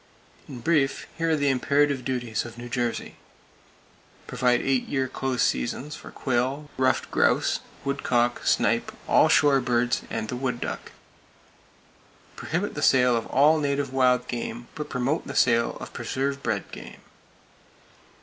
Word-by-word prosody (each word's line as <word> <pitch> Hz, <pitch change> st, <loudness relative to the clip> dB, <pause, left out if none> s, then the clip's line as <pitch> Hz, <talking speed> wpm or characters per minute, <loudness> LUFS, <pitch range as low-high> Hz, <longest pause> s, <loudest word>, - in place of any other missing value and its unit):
In 125 Hz, -4 st, -8 dB
brief, 145 Hz, -2 st, +1 dB
here 165 Hz, 0 st, -1 dB
are 160 Hz, -, +3 dB
the 145 Hz, -2 st, +1 dB
imperative 140 Hz, +1 st, +1 dB
duties 120 Hz, -4 st, -2 dB
of 120 Hz, 0 st, -10 dB
New 120 Hz, 0 st, -8 dB
Jersey: 120 Hz, -1 st, -3 dB, 1.1 s
Provide 125 Hz, 0 st, +1 dB
eight 135 Hz, -2 st, 0 dB
year 135 Hz, -2 st, 0 dB
close 130 Hz, -1 st, -1 dB
seasons 130 Hz, -, -1 dB
for -, -, -11 dB
quail, 135 Hz, +3 st, -2 dB
ruffed 130 Hz, 0 st, +1 dB
grouse, -, -, +2 dB, 0.3 s
woodcock, 120 Hz, -3 st, 0 dB
snipe, -, -, +1 dB, 0.2 s
all -, -, +5 dB
shore 140 Hz, -2 st, +4 dB
birds 120 Hz, -1 st, +1 dB
and 110 Hz, -, -3 dB
the 125 Hz, -, -4 dB
wood 125 Hz, -1 st, -2 dB
duck. -, -, -5 dB, 1.4 s
Prohibit -, -, -3 dB
the -, -, -5 dB
sale 125 Hz, -2 st, +4 dB
of 115 Hz, -, -2 dB
all 150 Hz, +4 st, +4 dB
native 140 Hz, -2 st, -1 dB
wild 125 Hz, -1 st, +3 dB
game; 120 Hz, 0 st, -5 dB
but 150 Hz, -1 st, -6 dB
promote 130 Hz, +6 st, -1 dB
the -, -, -6 dB
sale 115 Hz, -2 st, +3 dB
of -, -, -9 dB
preserve 140 Hz, +1 st, -2 dB
bred 110 Hz, -6 st, -2 dB
game. -, -, -10 dB
130 Hz, 145 wpm, -25 LUFS, 120-140 Hz, 1.4 s, all